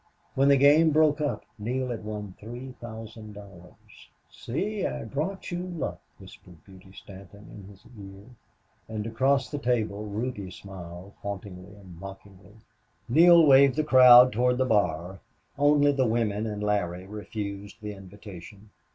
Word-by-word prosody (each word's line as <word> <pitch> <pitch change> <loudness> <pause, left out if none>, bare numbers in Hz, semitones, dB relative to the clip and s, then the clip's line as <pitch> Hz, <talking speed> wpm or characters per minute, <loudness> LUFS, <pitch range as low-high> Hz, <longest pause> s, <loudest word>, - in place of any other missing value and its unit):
When 135 +1 +2
the 140 -1 +5
game 145 +4 +5
broke 155 -1 +2
up 145 - -3
Neale 125 +4 -3
had 115 -2 -6
won 105 -2 -6
three 120 +4 -9
thousand 110 -2 -9
dollars. 100 -4 -16 0.2
"See! 200 - -4
I - - -3
brought 175 +9 -4
you 175 - -3
luck," 165 - -5 0.2
whispered 90 -4 -16
Beauty 95 0 -16
Stanton 100 +1 -14
in 100 -1 -12
his 100 -1 -18
ear. 100 -4 -13 0.7
And 110 -1 -5
across 130 +4 0
the 145 - -4
table 110 -5 -1
Ruby 105 -2 -4
smiled 90 0 -11
hauntingly 100 -1 -8
and 95 -4 -14
mockingly. 95 +1 -12 0.5
Neale 170 +6 +6
waved 135 -2 +6
the 155 - 0
crowd 125 -3 +8
toward 125 +2 +1
the 130 - +1
bar. 95 -5 -1 0.4
Only 145 0 +3
the 135 -3 +1
women 110 -2 -1
and 105 -1 -5
Larry 95 -4 -2
refused 100 0 -7
the 105 -1 -7
invitation. 100 +1 -13
105 Hz, 145 wpm, -26 LUFS, 100-130 Hz, 0.7 s, crowd